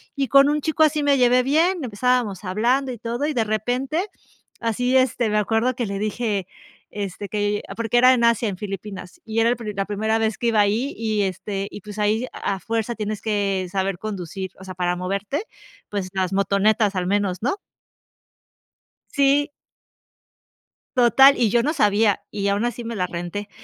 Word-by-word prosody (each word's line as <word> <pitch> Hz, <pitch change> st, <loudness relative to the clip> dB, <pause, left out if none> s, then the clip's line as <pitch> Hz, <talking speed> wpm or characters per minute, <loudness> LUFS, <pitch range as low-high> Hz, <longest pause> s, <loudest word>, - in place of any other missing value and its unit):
Y 275 Hz, -3 st, -1 dB
con 275 Hz, +2 st, +6 dB
un 300 Hz, 0 st, 0 dB
chico 315 Hz, +1 st, -1 dB
así 305 Hz, -1 st, +2 dB
me 285 Hz, -1 st, +3 dB
llevé 250 Hz, 0 st, +4 dB
bien, 325 Hz, +6 st, +2 dB
empezábamos 240 Hz, -3 st, 0 dB
hablando 240 Hz, +8 st, +1 dB
y 245 Hz, -, -6 dB
todo, 235 Hz, +5 st, -3 dB
y 310 Hz, -, -1 dB
de 230 Hz, -, +2 dB
repente 250 Hz, -, -1 dB, 0.5 s
así, 245 Hz, +3 st, +1 dB
este, 250 Hz, -3 st, +2 dB
me 210 Hz, -, +1 dB
acuerdo 225 Hz, +4 st, +1 dB
que 240 Hz, -, -2 dB
le 200 Hz, -1 st, -4 dB
dije, 210 Hz, -2 st, -2 dB, 0.4 s
este, 200 Hz, 0 st, -5 dB
que 205 Hz, +1 st, -1 dB, 0.2 s
porque 230 Hz, +1 st, +1 dB
era 255 Hz, +1 st, +7 dB
en 240 Hz, -2 st, +1 dB
Asia, 235 Hz, -1 st, +3 dB
en 190 Hz, -, -5 dB
Filipinas, 195 Hz, -1 st, -7 dB
y 225 Hz, 0 st, -2 dB
era 230 Hz, -, +4 dB
el, 245 Hz, -, -1 dB, 0.2 s
la 195 Hz, 0 st, -1 dB
primera 220 Hz, +2 st, 0 dB
vez 220 Hz, -1 st, 0 dB
que 240 Hz, -, 0 dB
iba 225 Hz, -2 st, +2 dB
ahí 220 Hz, +7 st, 0 dB
y, 220 Hz, -2 st, 0 dB
este 195 Hz, +1 st, -3 dB
y, -, -, -9 dB
pues, 210 Hz, +1 st, -9 dB
ahí 215 Hz, +3 st, +1 dB
a 195 Hz, -1 st, -3 dB
fuerza 230 Hz, +2 st, -2 dB
tienes 215 Hz, -1 st, -4 dB
que 200 Hz, -3 st, -1 dB
saber 190 Hz, -2 st, -1 dB
conducir, 190 Hz, -2 st, -5 dB
o -, -, -11 dB
sea, 190 Hz, 0 st, -7 dB
para 180 Hz, -1 st, -1 dB
moverte, 200 Hz, -, -3 dB, 0.5 s
pues, 200 Hz, -3 st, -3 dB
las 190 Hz, 0 st, -1 dB
motonetas 200 Hz, +2 st, +2 dB
al 180 Hz, -1 st, -1 dB
menos, 195 Hz, 0 st, -1 dB
¿no? 280 Hz, -, 0 dB, 1.5 s
Sí. 280 Hz, +1 st, +3 dB, 1.5 s
Total, 265 Hz, +3 st, +7 dB
y 235 Hz, -3 st, +2 dB
yo 235 Hz, +3 st, +3 dB
no 300 Hz, +6 st, 0 dB
sabía, 205 Hz, -, +2 dB
y 200 Hz, -1 st, -2 dB
aún 200 Hz, +2 st, +1 dB
así 240 Hz, 0 st, -3 dB
me 230 Hz, 0 st, -4 dB
la 185 Hz, -3 st, 0 dB
renté. 175 Hz, +4 st, -5 dB
215 Hz, 185 wpm, -22 LUFS, 200-245 Hz, 1.5 s, era